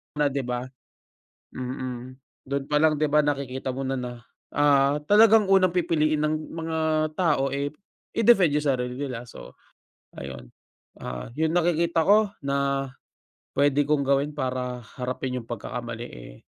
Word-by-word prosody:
Na 145 Hz, -2 st, +2 dB
di 140 Hz, -, -1 dB
ba, 125 Hz, -1 st, -3 dB, 0.9 s
mm. 130 Hz, 0 st, -5 dB, 0.3 s
Dun 140 Hz, +1 st, -2 dB
pa 150 Hz, -, +3 dB
lang 155 Hz, +1 st, +4 dB
di 150 Hz, -, +2 dB
ba, 150 Hz, 0 st, +3 dB
nakikita 135 Hz, -2 st, -2 dB
mo 135 Hz, -, -4 dB
na 135 Hz, 0 st, -2 dB
na, 120 Hz, -1 st, -6 dB, 0.3 s
ah, 145 Hz, 0 st, +3 dB
talagang 215 Hz, -1 st, +6 dB
unang 185 Hz, -2 st, +4 dB
pipiliin 155 Hz, -4 st, +1 dB
ng 155 Hz, 0 st, +1 dB, 0.2 s
mga 160 Hz, 0 st, -3 dB, 0.4 s
tao, 150 Hz, -7 st, +2 dB
eh, 140 Hz, +2 st, -2 dB, 0.4 s
i-defend 190 Hz, -10 st, +4 dB
yung 150 Hz, -, -2 dB
sarili 125 Hz, -2 st, -1 dB
nila, 130 Hz, -4 st, -4 dB
so -, -, -12 dB, 0.6 s
ayun. -, -, -9 dB, 0.5 s
Ah, 60 Hz, -, -6 dB
yung 160 Hz, +2 st, +1 dB
nakikita 170 Hz, -1 st, +2 dB
ko 205 Hz, +1 st, +4 dB
na 140 Hz, 0 st, 0 dB, 0.7 s
pwede 145 Hz, +1 st, +3 dB
kong 145 Hz, -1 st, 0 dB
gawin 140 Hz, +2 st, +2 dB
para 130 Hz, -3 st, -3 dB, 0.2 s
harapin 130 Hz, 0 st, -3 dB
yung 115 Hz, -, -12 dB
pagkakamali, 120 Hz, +1 st, -5 dB
eh, -, -, -11 dB
140 Hz, 145 wpm, -25 LUFS, 130-155 Hz, 0.9 s, talagang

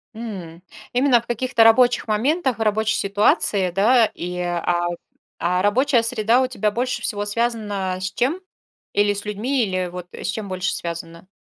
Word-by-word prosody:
М. 190 Hz, -8 st, -8 dB, 0.3 s
Именно 250 Hz, -1 st, +4 dB
в 235 Hz, -, -23 dB
каких-то 240 Hz, 0 st, +2 dB
рабочих 240 Hz, +2 st, +4 dB
моментах, 260 Hz, +4 st, 0 dB
рабочей 220 Hz, 0 st, +1 dB
ситуации, 200 Hz, -1 st, +1 dB
да? 220 Hz, +5 st, +4 dB
И, 180 Hz, +1 st, -5 dB
а 175 Hz, 0 st, -1 dB, 0.5 s
А 180 Hz, +1 st, 0 dB
рабочая 240 Hz, +5 st, +2 dB
среда 230 Hz, +2 st, +2 dB
у 260 Hz, -, +1 dB
тебя 235 Hz, -4 st, -1 dB
больше 250 Hz, +4 st, -2 dB
всего 205 Hz, -1 st, -1 dB
связана 205 Hz, -4 st, -1 dB
с 190 Hz, 0 st, -3 dB
чем? 275 Hz, -, -1 dB, 0.5 s
Или 205 Hz, 0 st, +2 dB
с 205 Hz, +1 st, -7 dB
людьми, 235 Hz, +6 st, -1 dB
или, 185 Hz, -3 st, -1 dB
вот, 180 Hz, 0 st, -8 dB
с -, -, -6 dB
чем 215 Hz, -3 st, -4 dB
больше 185 Hz, 0 st, -2 dB
связана? 170 Hz, +1 st, -6 dB
210 Hz, 160 wpm, -21 LUFS, 185-240 Hz, 0.5 s, Именно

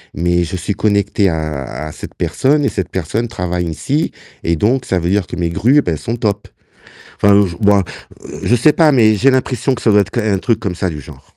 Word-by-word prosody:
mais 85 Hz, 0 st, +1 dB
je 95 Hz, +3 st, -5 dB
suis 100 Hz, +3 st, -3 dB
connecté 100 Hz, -1 st, +1 dB
à 80 Hz, -4 st, -3 dB, 0.2 s
à -, -, -7 dB
cette -, -, -9 dB
personne 145 Hz, +2 st, +1 dB
et -, -, +2 dB
cette 95 Hz, -3 st, -3 dB
personne 95 Hz, +7 st, -2 dB
travaille 90 Hz, -5 st, -3 dB
ici, 140 Hz, -, -2 dB, 0.3 s
et 85 Hz, 0 st, +1 dB
donc 125 Hz, +7 st, +1 dB
ça 95 Hz, -, 0 dB
veut 85 Hz, +1 st, -2 dB
dire 100 Hz, -1 st, +1 dB
que -, -, -6 dB
mes 85 Hz, -1 st, -1 dB
grues, 130 Hz, -, +3 dB
ben 85 Hz, -, -2 dB
elles 75 Hz, -, -5 dB
sont 115 Hz, -, 0 dB
top». 105 Hz, -3 st, -2 dB, 0.7 s
Enfin, 100 Hz, 0 st, +5 dB
je 85 Hz, -, -7 dB
bon, 100 Hz, -2 st, +3 dB, 0.6 s
je 120 Hz, -, +3 dB
sais 145 Hz, +6 st, +4 dB
pas, 160 Hz, -3 st, +4 dB
mais 110 Hz, -4 st, +4 dB
j'ai 135 Hz, +6 st, +3 dB
l'impression 130 Hz, 0 st, 0 dB
que 120 Hz, -, -9 dB
ça 110 Hz, -, +3 dB
doit 105 Hz, 0 st, +5 dB
être 100 Hz, 0 st, -4 dB
qu 120 Hz, -, -1 dB
un 100 Hz, -3 st, 0 dB
truc 115 Hz, 0 st, 0 dB
comme 95 Hz, -3 st, -3 dB
ça 90 Hz, +1 st, -2 dB
du 75 Hz, -2 st, -6 dB
genre. -, -, -13 dB
100 Hz, 240 wpm, -16 LUFS, 90-120 Hz, 0.7 s, Enfin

